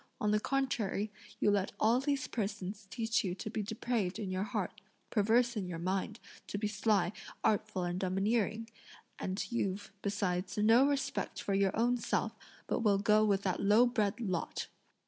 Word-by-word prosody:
On 210 Hz, -, +1 dB
the 210 Hz, -, +3 dB
contrary, 220 Hz, -6 st, -1 dB, 0.3 s
you 205 Hz, -, +4 dB
let 200 Hz, -1 st, 0 dB
all 230 Hz, +3 st, +4 dB
these 275 Hz, -1 st, 0 dB
persons 205 Hz, -2 st, -4 dB
teach 225 Hz, +3 st, 0 dB
you 180 Hz, -3 st, -2 dB
to 215 Hz, -, -6 dB
be 220 Hz, -, -1 dB
depraved 215 Hz, -2 st, -1 dB
in 195 Hz, -3 st, -4 dB
your 185 Hz, 0 st, -1 dB
heart, 205 Hz, 0 st, -3 dB, 0.3 s
perverse 235 Hz, +3 st, +3 dB
in 200 Hz, -4 st, -2 dB
your 175 Hz, -2 st, -4 dB
mind, 190 Hz, +5 st, -2 dB, 0.3 s
to -, -, -3 dB
be 210 Hz, +1 st, 0 dB
sly, 205 Hz, -2 st, +1 dB, 0.3 s
artful, 210 Hz, -3 st, +1 dB
and 175 Hz, +1 st, -2 dB
domineering; 210 Hz, +4 st, 0 dB, 0.5 s
and 190 Hz, +1 st, -2 dB
you've, 200 Hz, -4 st, -2 dB
besides, 185 Hz, -2 st, -1 dB
no 225 Hz, +6 st, +6 dB
respect 275 Hz, -1 st, -1 dB
for 200 Hz, -, -2 dB
your 195 Hz, 0 st, +2 dB
own 240 Hz, +2 st, +3 dB
self, -, -, -1 dB, 0.3 s
but -, -, -1 dB
will 210 Hz, -4 st, +3 dB
go 210 Hz, +2 st, +4 dB
with 200 Hz, -2 st, +2 dB
that 185 Hz, -2 st, 0 dB
low 210 Hz, +4 st, +6 dB
bred 220 Hz, -3 st, 0 dB
lot! 185 Hz, -7 st, -2 dB
210 Hz, 170 wpm, -33 LUFS, 195-225 Hz, 0.5 s, no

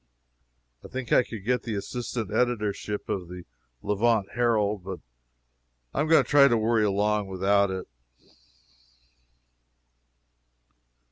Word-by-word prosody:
I -, -, -9 dB
think 130 Hz, -2 st, -6 dB
I -, -, +6 dB
could 110 Hz, -5 st, -8 dB
get 125 Hz, +1 st, +1 dB
the 115 Hz, -3 st, -4 dB
assistant 115 Hz, 0 st, -4 dB
editorship 105 Hz, -4 st, -1 dB
of 90 Hz, -3 st, -3 dB
the 90 Hz, 0 st, -9 dB, 0.4 s
Levant 105 Hz, 0 st, +1 dB
Herald, 105 Hz, -4 st, +1 dB
but 95 Hz, -2 st, -6 dB, 0.9 s
I -, -, 0 dB
am 155 Hz, -, 0 dB
going 160 Hz, 0 st, +5 dB
to -, -, -15 dB
try 140 Hz, -1 st, +6 dB
to 120 Hz, -3 st, +2 dB
worry 110 Hz, 0 st, +2 dB
along 105 Hz, 0 st, +1 dB
without 100 Hz, +1 st, +2 dB
it. 95 Hz, 0 st, -5 dB
105 Hz, 125 wpm, -26 LUFS, 100-120 Hz, 0.9 s, I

